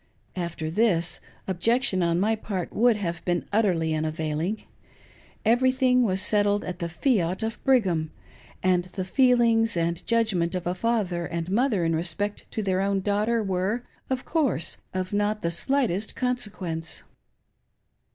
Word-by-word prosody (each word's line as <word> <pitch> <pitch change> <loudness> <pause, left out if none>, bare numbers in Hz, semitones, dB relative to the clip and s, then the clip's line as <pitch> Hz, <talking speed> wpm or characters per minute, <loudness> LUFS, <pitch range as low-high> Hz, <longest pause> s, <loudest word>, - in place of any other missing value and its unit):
After 170 -3 -4
this, 175 -4 +2 0.3
objection 195 +2 +2
on 170 0 +1
my 215 +4 +2
part 195 -5 -4
would 235 0 +3
have 170 -4 -4
been 175 -1 -1
utterly 175 -7 +2
unavailing. 155 +5 -2 0.8
Everything 255 +2 +3
was 190 -5 +2
settled 205 -1 +2
at 180 -1 -6
the 170 - -3
fiat 185 - 0
of 225 +1 -4
Brigham; 190 - +2 0.5
and 180 -1 +2
the 185 -2 -3
feelings 230 -2 +3
and 170 0 -1
judgment 200 -7 +1
of 180 - -3
a 175 - 0
father 185 -5 -1
and 170 +1 -4
mother 215 -5 +2
in 165 0 +1
respect 175 +5 -2
to 220 - -3
their 190 -1 +1
own 195 0 0
daughter 215 +3 +1
were, 195 +5 -1 0.3
of 260 -1 -2
course, 280 - 0
of 185 +1 -3
not 205 +1 0
the 170 - +1
slightest 215 0 0
consequence. 195 -10 -2
195 Hz, 140 wpm, -26 LUFS, 170-225 Hz, 0.8 s, would